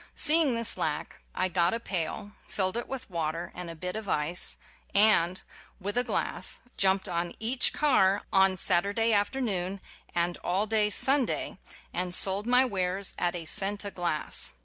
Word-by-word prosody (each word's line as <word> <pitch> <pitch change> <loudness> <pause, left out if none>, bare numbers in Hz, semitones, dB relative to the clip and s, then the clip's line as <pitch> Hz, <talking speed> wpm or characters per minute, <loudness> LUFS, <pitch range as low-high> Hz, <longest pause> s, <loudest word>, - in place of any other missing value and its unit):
See 315 +2 +4
ing 275 -6 +1
this 230 -3 0
lack 155 -3 -4 0.2
I 185 - 0
got 175 +2 +1
a - - -4
pail, 200 0 -4 0.2
filled 185 0 -1
it 235 - -3
with 265 -1 -7
water 165 -1 -4
and 180 -1 -8
a 165 - -8
bit 180 +4 -5
of 215 -2 -6
ice, 155 +4 -2 0.4
and, 190 -4 +4 0.4
with 200 +1 -4
a 245 - +2
glass, - - -2 0.2
jumped 190 0 +1
on 170 -1 -3
each 240 +3 +3
car 205 -10 +2
on 190 -1 +3
Saturday 200 +6 +1
after 205 +6 0
noon 195 -5 -2 0.4
and 175 0 -1
all 190 +4 -1
day 215 -1 +1
Sunday, 265 +6 0 0.3
and 180 0 +5
sold 195 +4 +4
my 250 +1 +4
wares 190 -3 -1
at 175 0 -1
a 170 -2 -6
cent 200 +4 +2
a 200 - -5
glass. 175 -5 -2
195 Hz, 170 wpm, -28 LUFS, 175-220 Hz, 0.4 s, and